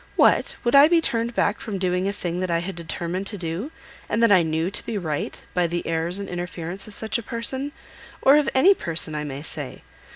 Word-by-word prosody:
What! - - +3
would 240 - +1
I 280 +2 +9
be 335 +1 +4
turned 235 -6 -1
back 210 - +1
from 210 -3 -4
doing 185 0 0
a - - +1
thing 175 -3 -3
that 185 0 -2
I 170 - +2
had 175 +2 -4
determined 170 +3 -4
to 205 - -4
do, 175 - -4 0.4
and 230 - +1
that 230 - +5
I 185 -3 +7
knew 160 +2 -1
to - - -5
be 225 - -3
right, 155 -6 -3
by 180 -1 +2
the 175 +1 -3
airs 165 +2 0
and 200 -1 -5
interference 175 +1 -3
of 210 - -6
such 220 +2 -1
a - - -5
person, 260 +5 -2 0.5
or 275 - +6
of 300 - +2
any 360 +10 +7
person 165 - +1
I 150 0 -2
may 140 -1 -6
say? - - -7
185 Hz, 230 wpm, -24 LUFS, 170-230 Hz, 0.5 s, I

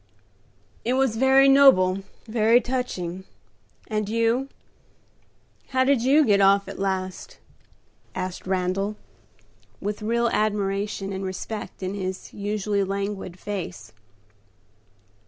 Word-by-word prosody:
"It 245 - 0
was 265 -3 +2
very 265 +3 +5
noble, 265 -10 +6 0.3
very 225 +1 +4
touching. 190 -9 -3 0.6
And 215 -1 -2
you? 230 +4 +1 1.2
how 260 -1 +2
did 265 -2 +3
you 280 +5 +4
get 200 -3 +4
off 195 0 +4
at - - -8
last?" 190 - -3 0.8
asked 185 0 -5
Randal, 190 +2 -1 0.8
with 205 +1 -4
real 235 +2 +1
admiration 200 -2 -1
and 190 0 -4
respect 190 +2 -6
in 185 +1 -2
his 190 -2 -5
usually 205 0 -1
languid 195 -2 -4
face. 175 - -6
205 Hz, 105 wpm, -24 LUFS, 190-235 Hz, 1.2 s, noble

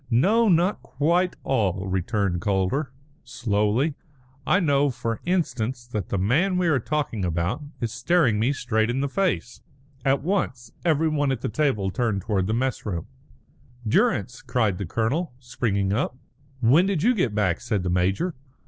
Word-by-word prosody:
"No, 205 - +4
not 180 +3 +2
quite 170 +6 +1
all," 95 -7 0
returned 95 -1 -1
Calder, 100 +9 0 0.3
slowly; 115 +5 0 0.5
"I 185 - +4
know, 145 -5 +3
for 115 -3 -3
instance, 130 -9 -1
that 110 -7 -4
the 100 - -1
man 150 - +2
we 180 - +1
are 140 -5 +3
talking 135 -6 -2
about 85 - -1 0.2
is 115 -2 -1
staring 120 -2 +2
me 120 +5 +2
straight 115 -5 0
in 130 +3 0
the 140 - 0
face." 180 -7 -1 0.4
At 135 -1 +2
once 130 - -2
everybody 155 -4 +2
at 125 - -5
the - - -2
table 110 -6 0
turned 110 -4 -1
towards 95 -4 0
the 110 - 0
mess 130 +2 -1
room. 90 -6 -3 0.8
"Durrance!" 105 +2 +1
cried 110 -7 0
the 100 - -3
colonel, 125 - -1
springing 100 -6 -1
up. 125 +2 -1 0.4
"When 145 +11 +5
did 190 -5 0
you 245 +3 +4
get 130 - 0
back?" 95 -5 +1
said 110 -6 -1
the 90 - -1
major. 95 - +1
120 Hz, 160 wpm, -24 LUFS, 105-150 Hz, 0.8 s, When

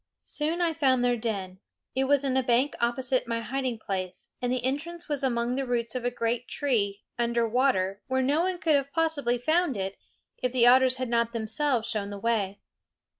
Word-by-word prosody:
Soon 315 +4 -2
I 335 -2 +2
found 260 -5 +2
their 245 0 +3
den. 200 -5 -4 0.3
It 265 +1 +1
was 285 0 +3
in 260 -1 0
a 265 - +4
bank 250 +3 +2
opposite 250 +1 +2
my 230 0 -1
hiding 255 0 -2
place, 190 -4 -4
and 245 0 0
the 255 0 -1
entrance 320 +6 -3
was 290 -3 -1
among 240 -2 0
the 270 +1 -1
roots 235 -2 -1
of 255 -2 -3
a - - +3
great 240 0 -2
tree, 210 -8 -1 0.2
under 235 -1 +1
water, 215 -6 +1
where 260 0 +1
no 290 +5 +2
one 370 0 0
could 325 -2 +1
have 280 -1 +1
possibly 290 -6 +1
found 310 - +1
it 195 0 -3 0.4
if 250 -2 -1
the 245 -2 +3
otters 255 +1 +6
had 255 0 -3
not 235 0 +1
themselves 230 +2 0
shown 215 -4 -2
the 205 - -6
way. 205 -3 0
245 Hz, 200 wpm, -27 LUFS, 230-275 Hz, 0.4 s, otters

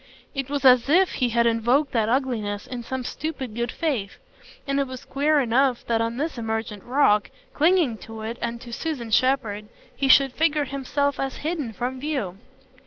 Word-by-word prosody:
It 275 -2 -3
was 285 -1 -2
as 250 0 +6
if 365 +4 +4
he 250 -2 0
had 235 0 +2
invoked 240 +5 +2
that 225 -2 +1
ugliness 230 -6 -1
in 250 -2 -6
some 260 +2 -4
stupid 265 -4 -5
good 235 +1 -2
faith; 250 -12 -2 0.5
and 275 0 0
it 275 - 0
was 255 -1 -8
queer 295 +2 +2
enough 255 0 +2
that 230 -1 +1
on 230 +1 -2
his 295 -2 -3
emergent 220 -2 -3
rock, 240 -5 +3 0.2
clinging 310 - +3
to 225 -1 -9
it 230 +2 -5
and 235 0 -3
to 240 -2 -9
Susan 255 -6 -4
Shepherd, 225 -4 +1 0.3
he 275 - 0
should 270 0 +6
figure 305 -2 +1
himself 280 +1 -1
as 270 -1 -2
hidden 310 -8 -2
from 250 +4 -4
view. 255 - -3
255 Hz, 180 wpm, -24 LUFS, 230-280 Hz, 0.5 s, as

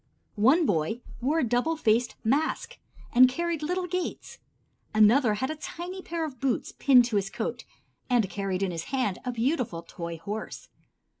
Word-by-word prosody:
One 300 +9 +5
boy 195 - 0 0.2
wore 285 +6 +1
a 325 - +2
double 245 +8 +1
faced 235 -2 +2
mask 315 - 0 0.3
and 255 +1 +8
carried 335 +3 -2
little 360 +4 -1
gates; 360 -1 -4 0.6
another 215 +1 +5
had 260 +7 -2
a - - -4
tiny 355 +4 -7
pair 335 -2 -3
of 265 -6 -8
boots 265 -2 -1
pinned 255 -3 +6
to 230 -3 0
his 195 -1 -1
coat - - -4 0.4
and 240 -5 +3
carried 195 -1 -2
in 190 - 0
his 165 -1 -5
hand 250 -9 -1
a 250 - -2
beautiful 235 - -1
toy 170 0 -6
horse. 205 +7 -6
250 Hz, 165 wpm, -27 LUFS, 210-315 Hz, 0.6 s, and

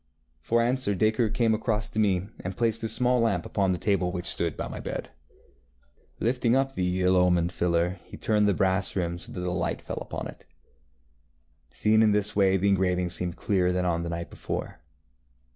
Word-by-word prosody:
ŌĆØ - - -44
For 115 0 +3
answer 120 -4 0
Dacre 110 +3 +2
came 115 +1 +2
across 110 -1 -1
to 110 - -2
me, 95 -3 +2
and 90 +1 -6
placed 115 -1 0
the 115 - -2
small 125 +2 +2
lamp 100 -7 +1
upon 95 -2 0
the 90 - 0
table 95 -2 0
which 90 -1 -4
stood - - -1
by - - -3
my - - -7
bed. - - -5 1.1
Lifting 120 0 +1
up 135 0 +1
the 90 -2 -1
ill 90 +1 +4
omened 90 -1 +3
filler, 85 +1 0
he - - -11
turned 105 -1 +2
the 100 - +2
brass 95 0 +1
rim 85 -2 -1
so - - -10
that - - -6
the 90 0 -2
light 90 0 -1
fell - - -6
full - - -4
upon - - -5
it. - - -13 1.2
Seen 110 +1 +3
in 110 -2 +4
this 105 0 0
way 95 -1 +4
the 100 +2 +2
engraving 90 -2 +1
seemed 90 0 -3
clearer 90 -3 +1
than 90 0 0
on 85 -1 0
the 85 - -4
night 85 0 -5
before. - - -5
95 Hz, 205 wpm, -27 LUFS, 90-110 Hz, 1.2 s, ill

